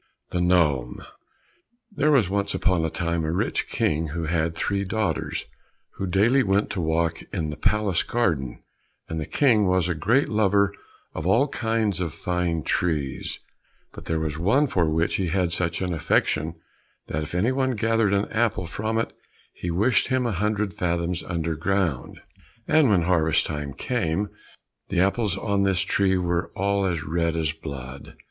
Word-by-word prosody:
91 90 Hz, 0 st, +1 dB
The 90 Hz, -, +6 dB
Gnome 70 Hz, -8 st, 0 dB, 0.9 s
There 150 Hz, -5 st, +1 dB
was 135 Hz, -, +4 dB
once 100 Hz, +1 st, -1 dB
upon 90 Hz, -4 st, +1 dB
a 80 Hz, -, 0 dB
time 85 Hz, 0 st, -1 dB
a 80 Hz, -, -1 dB
rich 85 Hz, -, -1 dB
King 80 Hz, +2 st, 0 dB
who 80 Hz, +3 st, -4 dB
had 80 Hz, 0 st, 0 dB
three 100 Hz, +4 st, -1 dB
daughters, 100 Hz, -4 st, -2 dB, 0.5 s
who 95 Hz, -, -2 dB
daily 110 Hz, +9 st, +3 dB
went 100 Hz, -2 st, +1 dB
to 95 Hz, -, -2 dB
walk 80 Hz, +1 st, 0 dB
in 75 Hz, -2 st, -2 dB
the -, -, -5 dB
palace 105 Hz, -2 st, +1 dB
garden, 80 Hz, -, -1 dB, 0.4 s
and 80 Hz, -, -4 dB
the 75 Hz, -, -4 dB
King 115 Hz, -8 st, +3 dB
was 90 Hz, -2 st, +2 dB
a 90 Hz, -, 0 dB
great 115 Hz, -, +2 dB
lover 100 Hz, -2 st, +2 dB, 0.4 s
of 80 Hz, -, -4 dB
all 115 Hz, +9 st, +4 dB
kinds 110 Hz, -6 st, 0 dB
of 85 Hz, -4 st, -3 dB
fine 90 Hz, -3 st, -1 dB
trees, 75 Hz, -6 st, -1 dB, 0.5 s
but -, -, -10 dB
there 80 Hz, -1 st, -1 dB
was 80 Hz, -1 st, -3 dB
one 110 Hz, -, +3 dB
for 90 Hz, -, +1 dB
which 80 Hz, +2 st, +1 dB
he 95 Hz, -, -1 dB
had 90 Hz, 0 st, 0 dB
such 85 Hz, +1 st, -1 dB
an 90 Hz, -1 st, -1 dB
affection, 80 Hz, 0 st, 0 dB, 0.5 s
that 80 Hz, -, -3 dB
if 75 Hz, +3 st, -6 dB
anyone 130 Hz, +6 st, +1 dB
gathered 115 Hz, -1 st, +2 dB
an 100 Hz, -, 0 dB
apple 110 Hz, -4 st, 0 dB
from 110 Hz, +6 st, -2 dB
it 115 Hz, -, -1 dB, 0.4 s
he 90 Hz, -, -5 dB
wished 105 Hz, +9 st, +2 dB
him 130 Hz, -1 st, +1 dB
a 120 Hz, -, 0 dB
hundred 105 Hz, +1 st, -1 dB
fathoms 85 Hz, 0 st, -1 dB
underground. 85 Hz, -2 st, -2 dB, 0.5 s
And 155 Hz, -5 st, +4 dB
when 95 Hz, -5 st, +3 dB
harvest 80 Hz, -3 st, +2 dB
time 75 Hz, -3 st, -4 dB
came, 100 Hz, -4 st, -1 dB, 0.6 s
the -, -, 0 dB
apples 100 Hz, +1 st, +1 dB
on 100 Hz, -1 st, 0 dB
this 95 Hz, -2 st, +2 dB
tree 95 Hz, -1 st, +2 dB
were 85 Hz, 0 st, -1 dB
all 100 Hz, 0 st, +1 dB
as 85 Hz, -4 st, -2 dB
red 85 Hz, +1 st, 0 dB
as 80 Hz, -3 st, 0 dB
blood. 70 Hz, -4 st, -8 dB
90 Hz, 170 wpm, -25 LUFS, 80-105 Hz, 0.9 s, The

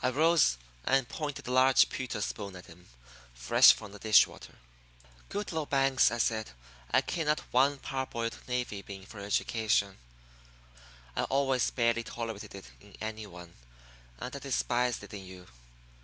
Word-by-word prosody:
I 125 Hz, -, +3 dB
rose 150 Hz, -, +3 dB, 0.3 s
and 135 Hz, -2 st, +2 dB
pointed 145 Hz, -1 st, -5 dB
a -, -, -3 dB
large 130 Hz, +1 st, +5 dB
pewter 125 Hz, -5 st, -4 dB
spoon 100 Hz, -2 st, -4 dB
at 90 Hz, -, -11 dB
him, 90 Hz, +2 st, -16 dB, 0.5 s
fresh -, -, +7 dB
from 100 Hz, -, -6 dB
the 105 Hz, -, -11 dB
dish 110 Hz, 0 st, +6 dB
water. -, -, -13 dB, 0.7 s
"Goodloe 165 Hz, -7 st, -3 dB
Banks," 135 Hz, -3 st, +3 dB
I 120 Hz, -, -3 dB
said, 110 Hz, -1 st, 0 dB, 0.4 s
"I -, -, +4 dB
care 165 Hz, -3 st, -3 dB
not 150 Hz, 0 st, +2 dB
one 135 Hz, +3 st, +3 dB
parboiled 130 Hz, -4 st, -3 dB
navy 125 Hz, -5 st, -2 dB
bean 95 Hz, -1 st, -10 dB
for 110 Hz, 0 st, -11 dB
your 100 Hz, -, -6 dB
education. 105 Hz, -2 st, 0 dB, 1.2 s
I -, -, 0 dB
always 135 Hz, -2 st, +1 dB
barely 115 Hz, -1 st, +1 dB
tolerated 115 Hz, -4 st, -6 dB
it 95 Hz, -, -10 dB
in 100 Hz, 0 st, -17 dB
any 110 Hz, -1 st, -5 dB
one, 90 Hz, -2 st, -12 dB, 0.6 s
and 125 Hz, -, -6 dB
I -, -, -5 dB
despised 125 Hz, -3 st, 0 dB
it 105 Hz, -, -11 dB
in 100 Hz, -2 st, -7 dB
you. 95 Hz, -1 st, -12 dB
115 Hz, 160 wpm, -30 LUFS, 100-135 Hz, 1.2 s, fresh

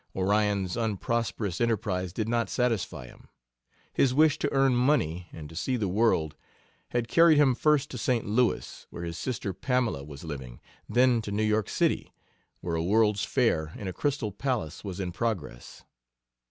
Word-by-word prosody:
Orion's 100 Hz, -1 st, +1 dB
unprosperous 110 Hz, -3 st, -2 dB
enterprise 95 Hz, -6 st, 0 dB
did 110 Hz, +4 st, -3 dB
not 115 Hz, 0 st, 0 dB
satisfy 95 Hz, -, -1 dB
him. -, -, -16 dB, 0.7 s
His 130 Hz, -2 st, +2 dB
wish 155 Hz, 0 st, +4 dB
to 145 Hz, -, -1 dB
earn 135 Hz, -2 st, +3 dB
money 105 Hz, -, +1 dB
and 75 Hz, -2 st, -9 dB
to 80 Hz, -, -13 dB
see 125 Hz, +9 st, -1 dB
the 105 Hz, -4 st, -1 dB
world 90 Hz, -6 st, +1 dB, 0.5 s
had 120 Hz, -1 st, -1 dB
carried 165 Hz, 0 st, +5 dB
him 140 Hz, -3 st, +5 dB
first 150 Hz, +2 st, +2 dB
to 125 Hz, -, -5 dB
St. 120 Hz, 0 st, 0 dB
Louis, 115 Hz, +4 st, 0 dB
where 85 Hz, -, -7 dB
his 85 Hz, 0 st, -5 dB
sister 110 Hz, -6 st, -3 dB
Pamela 120 Hz, -, -1 dB
was 70 Hz, -1 st, -10 dB
living, 65 Hz, -7 st, -7 dB, 0.3 s
then 125 Hz, -1 st, +4 dB
to 105 Hz, -, -6 dB
New 105 Hz, +2 st, 0 dB
York 110 Hz, -1 st, +1 dB
City, -, -, 0 dB, 0.5 s
where 85 Hz, -, -3 dB
a 80 Hz, -, -1 dB
World's 105 Hz, +2 st, +2 dB
Fair 80 Hz, -11 st, +1 dB
in 100 Hz, -, -6 dB
a 95 Hz, -, -3 dB
Crystal 135 Hz, -5 st, -1 dB
Palace 110 Hz, -, -3 dB
was 95 Hz, -2 st, -6 dB
in 90 Hz, -2 st, -3 dB
progress. 90 Hz, -, -4 dB
110 Hz, 165 wpm, -28 LUFS, 90-125 Hz, 0.7 s, carried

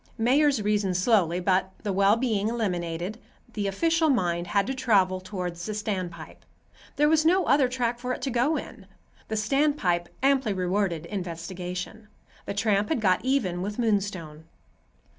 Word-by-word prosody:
Mayors 265 Hz, +1 st, +3 dB
reason 205 Hz, -3 st, +1 dB
slowly, 180 Hz, -3 st, +2 dB
but, 190 Hz, +1 st, +1 dB
the 205 Hz, -2 st, -1 dB
well 200 Hz, +2 st, +4 dB
being 225 Hz, -4 st, 0 dB
eliminated, 180 Hz, -3 st, -2 dB, 0.3 s
the 205 Hz, -2 st, -2 dB
official 325 Hz, +10 st, +2 dB
mind 175 Hz, -9 st, 0 dB
had 200 Hz, +2 st, +1 dB
to 265 Hz, -, -2 dB
travel 195 Hz, -8 st, +2 dB
toward 185 Hz, -2 st, -5 dB
the 195 Hz, +5 st, -5 dB
standpipe—there 190 Hz, -, -4 dB
was 315 Hz, 0 st, +3 dB
no 360 Hz, +4 st, +3 dB
other 275 Hz, 0 st, +4 dB
track 240 Hz, -2 st, -1 dB
for 250 Hz, +1 st, -3 dB
it -, -, -4 dB
to 270 Hz, -, -1 dB
go 250 Hz, +6 st, +1 dB
in. 200 Hz, -7 st, -9 dB, 0.4 s
The 220 Hz, -, -3 dB
standpipe 215 Hz, -, +1 dB, 0.2 s
amply 270 Hz, -6 st, +3 dB
rewarded 185 Hz, -3 st, -1 dB
investigation. 180 Hz, +3 st, -6 dB, 0.4 s
The 200 Hz, -, -3 dB
tramp 205 Hz, -1 st, +1 dB
had 315 Hz, -, +1 dB
got 185 Hz, -4 st, +2 dB
even 230 Hz, -10 st, 0 dB
with 205 Hz, +2 st, -4 dB
Moonstone. 195 Hz, -9 st, -2 dB
205 Hz, 150 wpm, -26 LUFS, 180-245 Hz, 0.4 s, well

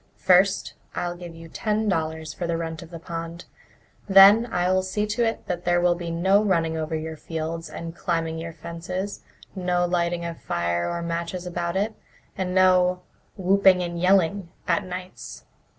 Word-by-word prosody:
First, 185 Hz, +1 st, +3 dB, 0.2 s
I'll 175 Hz, 0 st, -2 dB
give 175 Hz, -1 st, -9 dB
you 165 Hz, 0 st, -11 dB
ten 215 Hz, +5 st, -1 dB
dollars 160 Hz, -4 st, -2 dB
for 175 Hz, -, -4 dB
the 170 Hz, -1 st, 0 dB
rent 165 Hz, -1 st, -4 dB
of 170 Hz, -, -11 dB
the 170 Hz, -, -8 dB
pond; 165 Hz, +1 st, -6 dB, 0.6 s
then 200 Hz, +4 st, +8 dB
I'll 180 Hz, +1 st, +2 dB
see 190 Hz, +3 st, -1 dB
that 210 Hz, -5 st, -1 dB
there 175 Hz, 0 st, +2 dB
will 175 Hz, 0 st, +3 dB
be 175 Hz, -1 st, -5 dB
no 190 Hz, +5 st, +3 dB
running 165 Hz, -5 st, +1 dB
over 160 Hz, 0 st, -2 dB
your 160 Hz, 0 st, -4 dB
fields 165 Hz, +1 st, -5 dB
and 165 Hz, 0 st, -7 dB
climbing 165 Hz, -2 st, -2 dB
your 165 Hz, 0 st, -5 dB
fences, 175 Hz, +5 st, -5 dB, 0.3 s
no 180 Hz, -1 st, +1 dB
lighting 175 Hz, -1 st, 0 dB
of 170 Hz, -1 st, -6 dB
fire 85 Hz, 0 st, -1 dB
or 170 Hz, 0 st, -3 dB
matches 170 Hz, +2 st, -3 dB
about 175 Hz, 0 st, -3 dB
it, 210 Hz, +3 st, 0 dB, 0.4 s
and 185 Hz, -1 st, -2 dB
no 180 Hz, -1 st, +4 dB, 0.3 s
'whooping 190 Hz, -1 st, +4 dB
and 170 Hz, -1 st, -4 dB
yelling' 185 Hz, 0 st, +3 dB, 0.2 s
at 170 Hz, -, +2 dB
nights. 185 Hz, 0 st, -8 dB
175 Hz, 165 wpm, -24 LUFS, 165-185 Hz, 0.6 s, then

